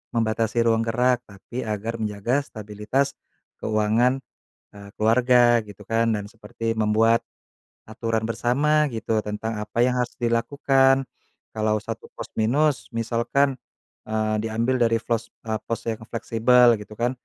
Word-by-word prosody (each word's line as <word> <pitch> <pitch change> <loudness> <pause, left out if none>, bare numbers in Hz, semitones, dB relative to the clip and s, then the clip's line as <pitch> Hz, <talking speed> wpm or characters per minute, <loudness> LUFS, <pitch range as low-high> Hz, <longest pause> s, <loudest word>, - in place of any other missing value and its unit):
membatasi 115 +1 +1
ruang 115 0 +3
gerak, 125 +2 +1
tapi 105 +5 -8
agar 110 +1 -3
menjaga 110 +5 -1
stabilitas 110 +5 -2 0.5
keuangan, 110 +4 +2 0.5
eee, 100 0 -11
keluarga 120 +2 +4
gitu 105 0 -12
kan, 115 +2 +1
dan 105 -1 -4
seperti 115 0 -5
membuat 110 +2 +3 0.7
aturan 110 0 -2
bersama 145 +7 +2
gitu 110 -1 -1
tentang 105 +1 -4
apa 105 +2 -4
yang 125 0 +2
harus 125 -1 -2
dilakukan. 135 +3 +2 0.5
Kalau 110 -1 0
satu 115 0 -6
pos - - -8
minus, 130 +2 +1
misalkan, 120 +4 0 0.5
eee, 110 0 0
diambil 115 +4 0
dari 115 -1 +3
flos 115 -1 -1 0.2
eee, 110 -1 -2
pos 115 -1 -3
yang 110 -1 -2
fleksibel 120 +1 +4
gitu 105 +1 -11
kan. 120 +3 0
115 Hz, 130 wpm, -24 LUFS, 110-125 Hz, 0.7 s, keluarga